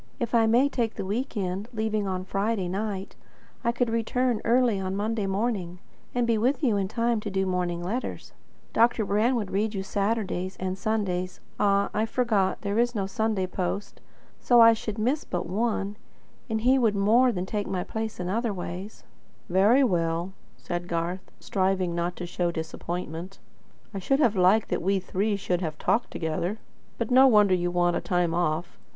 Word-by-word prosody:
If 235 -2 -3
I 225 -1 +4
may 240 +5 +4
take 235 -5 -2
the - - -4
week 230 +5 -3
end, 190 +2 -2
leaving 215 -3 -1
on 185 -1 -3
Friday 195 0 -1
night, 195 +1 -4 0.5
I 235 - +2
could 240 -1 0
return 230 +1 0
early 235 -3 +3
on 190 0 -3
Monday 210 0 -1
morning, 195 -3 -2 0.4
and 245 -1 +2
be 230 -2 +2
with 260 +7 +1
you 235 -6 +3
in 195 -1 0
time 230 +2 0
to 210 - -5
do 190 -1 0
the 190 - 0
morning 175 -1 -1
letters. 230 +8 -4 0.4
Dr. 230 -1 +3
Brand 215 +6 +2
would 210 -5 -2
read 210 +2 0
you 190 - -2
Saturday's 195 -2 -2
and 185 0 -2
Sunday's 185 -3 -2 0.2
Ah, 200 -1 +2
I 220 +1 0
forgot; 220 -6 +1
there 205 +1 -1
is 240 0 +1
no 200 -2 0
Sunday 205 0 -1
post. 185 +2 -4 0.4
So 240 -1 +4
I 230 0 +9
should 215 -1 -5
miss 255 +8 0
but 175 - -3
one; 205 +1 -1 0.5
and 220 -1 -1
he 260 +3 +4
would 225 -4 +2
more 225 +6 +4
than 185 -4 -3
take 205 +1 -3
my 185 -2 -2
place 220 -2 -5
in 180 - -3
other 225 +4 0
ways." 185 +3 -7 0.5
"Very 205 +9 +5
well," 170 -4 0 0.2
said 175 +8 -4
Garth, 170 +2 -3
striving 185 -2 0
not 170 +1 -2
to 175 - -5
show 175 0 -1
disappointment. 170 +2 -5 0.6
"I 195 - -3
should 270 +9 +1
have 240 -8 +3
liked 190 +4 +4
that - - -1
we 195 +3 +2
three 200 +3 -1
should 180 -2 -1
have 155 -3 -3
talked 235 - +1
together. 170 +5 -2 0.4
But 230 +1 -3
no 260 +2 +7
wonder 210 -5 +5
you 175 -1 +1
want 175 0 +2
a - - -3
time 175 -2 0
off. 170 0 -1
200 Hz, 185 wpm, -26 LUFS, 180-225 Hz, 0.6 s, I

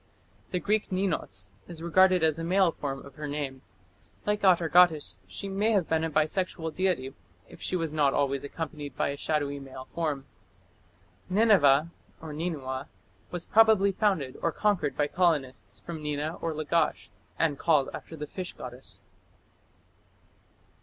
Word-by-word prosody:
The 180 - -1
Greek 210 +2 0
Ninus 130 - -2
is 165 -2 -8
regarded 185 +1 +4
as 160 0 +2
a - - -3
male 185 +1 +3
form 135 -3 -5
of 140 - -12
her 150 -1 -4
name; 140 -3 -4 0.6
like 210 0 0
Atargatis, 175 -3 +4
she 200 - -6
may 205 +3 +1
have 190 -5 +2
become 160 0 +2
a 165 - 0
bisexual 160 +1 0
deity, 160 -8 0 0.3
if - - -14
she - - -1
was 165 -3 -1
not 145 -3 +3
always 140 -1 0
accompanied 150 -1 -6
by - - +1
a 140 - -2
shadowy 145 -1 -1
male 130 -1 -9
form. 150 -5 -3 1.0
Nineveh 170 -8 +5 0.3
(Ninua) 150 -4 -4 0.4
was 175 -1 -3
probably 220 -3 +5
founded 185 -10 0
or 165 - +1
conquered 195 -6 0
by 145 - +3
colonists 145 -6 0
from 165 -2 -7
Nina 150 +2 -2
or 165 -2 -2
Lagash, 155 +1 0 0.3
and 145 -4 +1
called 150 -5 +3
after 160 - -8
the 150 -1 -5
fish 180 +4 -6
goddess. 125 +1 -7
160 Hz, 145 wpm, -28 LUFS, 145-180 Hz, 1.0 s, Nineveh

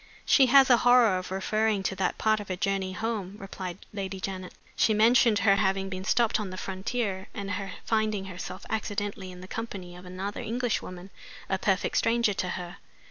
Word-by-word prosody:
"She 265 -2 +6
has 265 +1 +7
a 240 - +8
horror 240 -6 +5
of 185 - -8
referring 210 +2 0
to 190 - -1
that 185 -2 0
part 215 0 +2
of 205 - -7
her 185 - -2
journey 195 0 -1
home," 205 -2 -3
replied 190 -2 -7
Lady 195 -2 -4
Janet. 185 -1 -5 0.2
"She 215 - +3
mentioned 230 0 +5
her 195 -1 +6
having 195 0 +1
been 185 0 -5
stopped 230 0 +2
on 210 -3 -3
the 185 - -7
frontier, 190 +1 -3
and 200 -1 -4
her 195 +1 -4
finding 215 -3 0
herself 185 0 -7
accidentally 205 -3 -3
in 180 0 -11
the 185 - -9
company 190 -5 -6
of 180 +1 -12
another 190 +3 -5
Englishwoman, 210 -6 -3 0.4
a 190 - 0
perfect 195 -1 +1
stranger 230 -2 +2
to 185 -1 -2
her. 180 +1 -5
195 Hz, 190 wpm, -28 LUFS, 185-220 Hz, 0.4 s, a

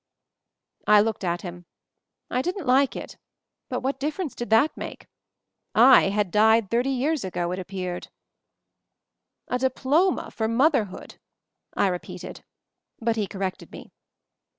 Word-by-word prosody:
I 210 0 +7
looked 220 0 0
at 175 -1 -2
him. 175 -1 -8 0.6
I 250 - +1
didn't 360 +2 -3
like 265 +1 +3
it - - -8 0.3
— - - -60
but - - -2
what 270 +1 -2
difference 300 +2 -3
did 240 - -6
that 225 +8 +4
make? - - -8 0.7
I 245 -2 +7
had 200 -2 0
died 220 0 +4
thirty 240 +3 +1
years 275 +2 0
ago, 175 -2 -3
it 185 - -3
appeared. 185 -1 -5 1.4
"A 250 - -1
diploma 275 +8 +1
for 220 -1 -2
motherhood!" 230 - 0 0.6
I - - +3
repeated; 180 -2 -5 0.6
but 230 0 0
he 210 -3 -1
corrected 190 -2 -5
me. - - -11
225 Hz, 135 wpm, -25 LUFS, 195-265 Hz, 1.4 s, I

